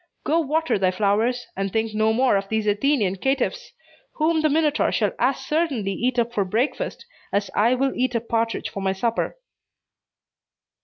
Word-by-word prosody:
Go 325 +2 +2
water 320 -5 0
thy 185 -1 +3
flowers, 215 +6 +1
and 195 0 -2
think 220 +1 -1
no 215 +1 +2
more 250 0 +3
of 195 0 -1
these 220 -1 0
Athenian 210 -2 +1
caitiffs, 280 - -1 0.4
whom 315 +1 +1
the 310 - +3
Minotaur 305 0 +2
shall 210 -4 +1
as 260 +2 +2
certainly 270 -7 -1
eat 245 +5 -1
up 235 0 +1
for 205 - +1
breakfast 225 - -2 0.3
as 200 0 -1
I 230 +4 +3
will 270 +1 0
eat 250 -1 0
a - - +3
partridge 230 0 -2
for 200 - -5
my 190 0 0
supper." 230 - -1
235 Hz, 170 wpm, -23 LUFS, 205-275 Hz, 0.4 s, thy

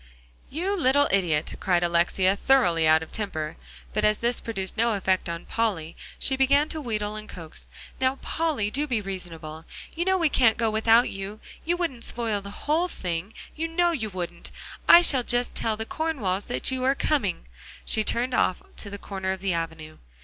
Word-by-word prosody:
"You 365 +7 -1
little 285 -4 +3
idiot!" 170 -6 +1
cried 175 -2 +2
Alexia, 175 +3 +2
thoroughly 175 -11 +3
out 160 +1 +5
of 160 - -12
temper. 160 -8 -3 0.4
But - - 0
as 210 0 +3
this 240 +1 0
produced 195 -5 -4
no 230 0 +2
effect 190 -2 0
on 170 0 -5
Polly, 190 -9 -2 0.2
she 265 - +1
began 280 +3 +3
to 315 - -3
wheedle 215 -5 -3
and 215 0 -8
coax. 165 -4 -9 0.3
"Now, 260 0 +2
Polly, 280 -9 -1
do 290 +5 0
be 245 -5 0
reasonable. 170 -5 -7 0.3
You 345 +2 -1
know 380 0 +3
we 335 -3 +3
can't 235 -6 +4
go 225 -2 +1
without 225 +2 +4
you; 195 +2 -6 0.3
you 345 +2 +1
wouldn't 275 -10 -3
spoil 225 -4 0
the 200 +1 -10
whole 320 +4 +2
thing; 180 - -4 0.2
you 325 +1 -2
know 345 +1 +2
you 230 -10 -3
wouldn't. 180 -3 -6 0.4
I 345 - +10
shall 270 -6 +5
just 245 0 0
tell 220 -1 -1
the 220 - -4
Cornwalls 225 - -2
that 125 - -2
you 260 -1 -2
are 270 +1 +3
coming," 265 - +1
and - - -23 0.4
she 220 - +1
turned 245 +4 0
off 185 -6 +1
to 205 - -3
the 200 - -6
corner 190 -1 -4
of 190 - -8
the 195 -2 0
avenue. 160 -2 -5
215 Hz, 195 wpm, -26 LUFS, 185-265 Hz, 0.4 s, I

